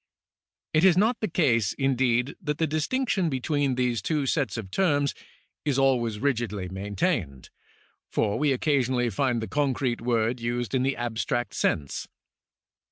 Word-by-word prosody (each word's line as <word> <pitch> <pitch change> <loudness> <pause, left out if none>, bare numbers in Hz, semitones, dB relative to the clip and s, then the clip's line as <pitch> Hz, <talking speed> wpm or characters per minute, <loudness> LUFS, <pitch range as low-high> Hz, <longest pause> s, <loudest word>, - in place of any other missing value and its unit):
It 155 +1 +3
is 185 -2 +6
not 225 +5 +3
the 215 - -1
case, 125 - +2
indeed, 130 -1 +1
that 150 -4 -2
the 160 - +2
distinction 175 - 0
between 140 0 0
these 125 -4 0
two 150 +4 0
sets 135 -2 0
of 100 -4 -6
terms 145 - +2 0.5
is 140 -3 0
always 125 -5 +2
rigidly 115 -7 -1
maintained, 100 - -2 0.6
for 105 -2 0
we 150 -1 +2
occasionally 130 -3 +1
find 120 +2 0
the - - -4
concrete 135 -4 0
word 120 0 0
used 120 +1 -2
in 130 - +2
the 135 +1 0
abstract 120 -2 -2
sense. 75 -6 -1
130 Hz, 145 wpm, -26 LUFS, 115-145 Hz, 0.6 s, is